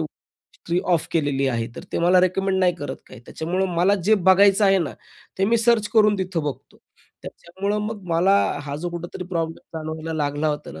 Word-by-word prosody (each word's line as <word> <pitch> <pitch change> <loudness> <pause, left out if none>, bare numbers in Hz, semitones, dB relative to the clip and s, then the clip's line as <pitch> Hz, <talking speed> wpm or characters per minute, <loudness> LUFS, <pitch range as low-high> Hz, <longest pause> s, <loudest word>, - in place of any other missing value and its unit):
History 170 +2 -6
of 160 - -1
केलेली 145 -4 0
आहे 115 -2 -1
तर - - -7
ते - - -1
मला 180 +2 +5
रिकमेंड 190 +1 +1
नाही 180 -2 +3
करत 145 -4 -6
काही, - - -13
त्याच्यामुळं 180 +4 -2
मला 185 +4 +4
जे 220 - +5
बघायचं 195 +1 +4
आहे 195 -1 +4
ना, 165 -5 -2 0.5
ते 195 - +3
मी 230 +3 +3
सर्च 230 -2 +2
करून 210 -2 +4
तिथं 185 -4 -2
बघतो. 135 -3 -6 0.4
त्याच्यामुळं 200 +4 -4
मग 215 -2 -6
मला 175 +4 +3 0.3
हा 145 -1 -6
जो 175 - -2
कुठेतरी 175 +1 -6
प्रॉब्लेम 165 -2 -2 0.2
जाणवायला 155 +1 -5
लागला 145 +2 -1
होता 150 0 -4
ना, 80 - -10
175 Hz, 190 wpm, -22 LUFS, 155-195 Hz, 0.5 s, मला